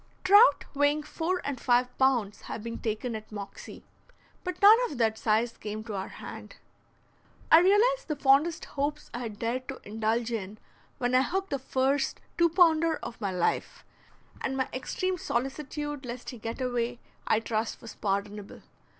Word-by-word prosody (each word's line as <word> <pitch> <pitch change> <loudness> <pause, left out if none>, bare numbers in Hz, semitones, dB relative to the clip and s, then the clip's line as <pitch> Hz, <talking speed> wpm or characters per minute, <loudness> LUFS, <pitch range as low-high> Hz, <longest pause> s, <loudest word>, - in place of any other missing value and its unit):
Trout 410 +6 +6
weighing 290 +1 +2
four 345 +4 -2
and 275 -3 -3
five 250 0 +2
pounds 245 -6 +2
have 215 - -5
been 230 0 -5
taken 225 +2 -3
at 215 0 -8
Moxie, 200 -1 -8 0.6
but 365 - -4
none 415 +3 +9
of 285 - -7
that 225 -2 +2
size 225 +2 +1
came 215 +1 -6
to 220 -1 -7
our 190 -1 -3
hand. - - -10 1.0
I 320 - +10
realized 435 +8 +3
the 305 - -1
fondest 290 +4 +3
hopes 295 +1 -3
I 240 - -4
had 225 -4 -6
dared 245 +3 -2
to 270 - -6
indulge 225 +2 -1
in 210 -2 -4 0.4
when 245 -2 -1
I 255 - +6
hooked 385 +7 -2
the 275 - -1
first 265 +2 0 0.2
two 340 0 +4
pounder 330 -2 +4
of 235 - -7
my 200 - 0
life, 180 -2 -1 0.6
and 265 0 -1
my 260 - 0
extreme 365 +8 -2
solicitude 290 +3 -3
lest 245 +1 -6
he 245 - -10
get 230 +4 -5
away 245 -1 -1 0.3
I 220 - +3
trust 225 0 -2
was 230 - -10
pardonable. 200 0 -3
255 Hz, 165 wpm, -28 LUFS, 225-300 Hz, 1.0 s, I